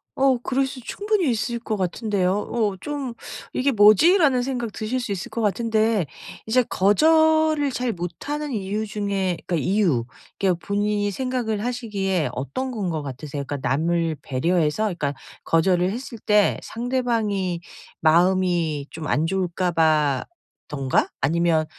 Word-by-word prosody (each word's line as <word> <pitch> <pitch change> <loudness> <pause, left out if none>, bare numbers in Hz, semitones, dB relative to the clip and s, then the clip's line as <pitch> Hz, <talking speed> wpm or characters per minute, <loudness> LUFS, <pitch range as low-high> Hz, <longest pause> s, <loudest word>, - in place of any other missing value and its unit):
어 265 -1 +3
그럴 265 +1 +1
수 265 -1 -8
충분히 410 - -1
있을 235 +1 -1
거 225 -2 -3
같은데요. 190 0 0
어 210 -2 -1
좀 285 -4 -4 0.4
'이게 275 +2 +1
뭐지?'라는 255 - +5
생각이 245 -3 -3
드실 220 +4 -2
수 245 -4 -4
있을 190 -3 -4
것 230 - -3
같은데 220 -2 +1 0.4
이제 245 +3 +3
거절을 315 - +3
잘 250 -1 -1
못하는 275 - -4
이유 210 -1 -2
중에 200 -4 -1
그러니까 175 - 0
이유, 170 - +1 0.3
이게 190 -2 +3
본인이 205 +4 -1
생각을 235 -2 -2
하시기에 200 - -1
어떤 255 - -3
건 220 -4 -4
거 160 -2 -2
같으세요? 140 +1 -6
그러니까 140 -2 -4
남을 165 +3 0
배려해서, 155 +7 0
그러니까 170 -9 -1 0.3
거절을 180 +2 +2
했을 245 -1 -7
때 210 -1 +3
상대방이 225 -7 -1 0.4
마음이 170 -2 +2
좀 160 -2 -6
안 155 - +1
좋을까봐든가 160 - 0
아니면 160 +2 +2
205 Hz, 305 characters per minute, -23 LUFS, 170-245 Hz, 0.4 s, 뭐지?'라는